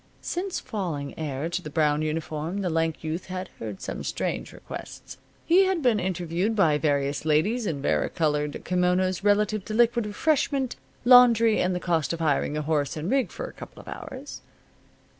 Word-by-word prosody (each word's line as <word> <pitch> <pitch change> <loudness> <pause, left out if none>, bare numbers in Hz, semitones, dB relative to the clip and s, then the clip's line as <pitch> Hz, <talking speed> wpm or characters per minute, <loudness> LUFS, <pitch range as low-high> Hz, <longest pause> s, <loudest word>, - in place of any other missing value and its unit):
Since 365 +1 -2
falling 175 - -4
heir 150 -1 -3
to 175 +2 -2
the 150 - -7
brown 150 -1 +2
uniform 155 +3 -3
the 180 -3 -1
lank 165 -1 -1
youth 160 +3 -4
had 185 0 -5
heard 105 -4 -6
some - - -5
strange - - -3
requests. - - -9 0.3
He 365 +4 +5
had 375 -5 0
been 235 -4 +3
interviewed 180 +3 -1
by 160 -7 +3
various 145 -2 0
ladies 200 +10 +1
in 140 -4 -3
varicolored 150 -2 0
kimonos 180 +1 +1
relative 210 0 +2
to 215 - -4
liquid 235 -1 +3
refreshment, 275 +2 0 0.3
laundry 235 -3 +7
and 180 0 +1
the - - -1
cost 165 -5 0
of 170 - -4
hiring 150 -1 +1
a 150 - -2
horse 150 -1 0
and 160 +7 -3
rig 270 -2 +2
for - - -6
a - - -9
couple - - -11
of - - -13
hours. 270 +2 -8
180 Hz, 175 wpm, -26 LUFS, 155-225 Hz, 0.3 s, laundry